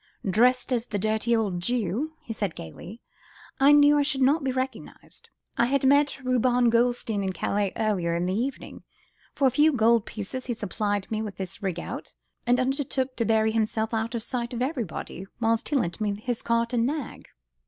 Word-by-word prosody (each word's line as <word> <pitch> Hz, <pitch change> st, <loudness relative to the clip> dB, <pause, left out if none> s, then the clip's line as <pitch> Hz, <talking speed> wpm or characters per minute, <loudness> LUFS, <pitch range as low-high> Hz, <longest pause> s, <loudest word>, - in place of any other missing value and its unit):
"Dressed 250 Hz, +6 st, +3 dB
as 240 Hz, 0 st, -1 dB
the 205 Hz, -, -2 dB
dirty 220 Hz, +3 st, +1 dB
old 205 Hz, -6 st, 0 dB
Jew," 240 Hz, -, -1 dB
he 225 Hz, -, -6 dB
said 205 Hz, -6 st, -3 dB
gaily, 180 Hz, -, -10 dB, 0.6 s
"I 275 Hz, +2 st, +6 dB
knew 290 Hz, 0 st, +6 dB
I -, -, +4 dB
should 280 Hz, -2 st, +1 dB
not 285 Hz, +4 st, +3 dB
be 265 Hz, -, 0 dB
recognised. 260 Hz, +1 st, -6 dB, 0.3 s
I 235 Hz, -, +4 dB
had 275 Hz, +1 st, +1 dB
met 285 Hz, 0 st, +3 dB
Reuben 250 Hz, -1 st, +3 dB
Goldstein 235 Hz, -3 st, +1 dB
in 190 Hz, -1 st, -2 dB
Calais 200 Hz, +1 st, -1 dB
earlier 185 Hz, -6 st, 0 dB
in 170 Hz, +1 st, 0 dB
the 185 Hz, -, -1 dB
evening. 255 Hz, +7 st, -4 dB, 0.5 s
For 275 Hz, -, +1 dB
a -, -, +2 dB
few 295 Hz, +5 st, +4 dB
gold 230 Hz, -3 st, +3 dB
pieces 230 Hz, +5 st, -5 dB
he 240 Hz, -, -1 dB
supplied 205 Hz, -1 st, -2 dB
me 215 Hz, 0 st, -1 dB
with 210 Hz, -3 st, -6 dB
this 190 Hz, +3 st, -6 dB
rig 185 Hz, -4 st, -2 dB
out, -, -, -7 dB, 0.3 s
and 245 Hz, +1 st, +4 dB
undertook 265 Hz, 0 st, -1 dB
to 230 Hz, -, 0 dB
bury 220 Hz, 0 st, +3 dB
himself 220 Hz, 0 st, -1 dB
out 225 Hz, +1 st, -1 dB
of 225 Hz, -, -3 dB
sight 240 Hz, 0 st, -3 dB
of 235 Hz, -, -3 dB
everybody, 230 Hz, -, -4 dB
whilst 225 Hz, -1 st, +1 dB
he 295 Hz, -, 0 dB
lent 190 Hz, -8 st, -1 dB
me 205 Hz, -1 st, -1 dB
his 240 Hz, +1 st, -3 dB
cart 230 Hz, +1 st, 0 dB
and 235 Hz, 0 st, +2 dB
nag." 290 Hz, -3 st, -5 dB
230 Hz, 195 wpm, -26 LUFS, 210-255 Hz, 0.6 s, I